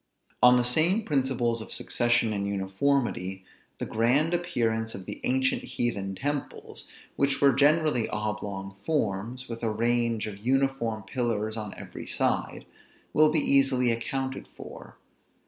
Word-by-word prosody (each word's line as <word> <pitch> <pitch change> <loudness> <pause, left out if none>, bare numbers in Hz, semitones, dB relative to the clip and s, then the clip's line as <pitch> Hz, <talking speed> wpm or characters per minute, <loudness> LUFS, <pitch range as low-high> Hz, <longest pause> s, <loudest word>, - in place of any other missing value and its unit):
On 125 +1 +7
the 125 - +3
same 160 - +2
principles 130 - 0
of - - -9
succession 120 -2 +1
and 100 -1 -2
uniformity, 95 -1 -1 0.3
the - - -3
grand 130 +9 +2
appearance 115 -10 -1
of 95 -1 -8
the - - -7
ancient 130 +1 +1
heathen 100 -5 -3
temples, 145 +7 -5 0.3
which 140 0 +1
were 140 -1 +5
generally 145 -2 +3
oblong 105 -2 -4
forms, 120 -3 -2
with 115 -1 -6
a 115 - 0
range 115 0 0
of 105 -2 -7
uniform 125 -3 0
pillars 110 -1 -2
on 105 -3 -6
every - - -9
side, - - -1 0.5
will 155 0 +5
be 155 -1 +2
easily 135 -3 +3
accounted 130 +3 -3
for. - - -12
120 Hz, 135 wpm, -27 LUFS, 110-135 Hz, 0.5 s, On